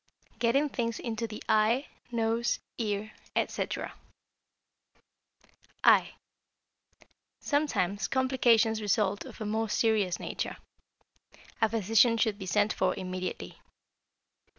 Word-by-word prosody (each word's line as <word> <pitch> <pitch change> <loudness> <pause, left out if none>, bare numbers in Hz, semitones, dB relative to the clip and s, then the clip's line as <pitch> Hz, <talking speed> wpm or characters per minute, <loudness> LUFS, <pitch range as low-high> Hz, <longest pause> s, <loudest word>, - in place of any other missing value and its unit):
Getting 265 +5 +3
Things 230 -4 -2
into 230 -1 -3
the 215 -1 -8
Eye, 220 +6 +3 0.3
Nose, 230 0 0 0.2
Ear, 215 -1 -2 0.2
etc. - - -2 1.9
=Eye.= - - +5 1.3
Sometimes 205 - 0
complications 245 -4 +3
result 205 0 0
of - - -11
a 215 - -4
most 220 +1 -1
serious 210 -6 +2
nature. - - -4 1.0
A 225 - +4
physician 225 +2 +3
should 220 -2 +1
be 190 - -6
sent 205 +3 +2
for - - +1
immediately. 185 -1 -5
220 Hz, 100 wpm, -29 LUFS, 205-235 Hz, 1.9 s, =Eye.=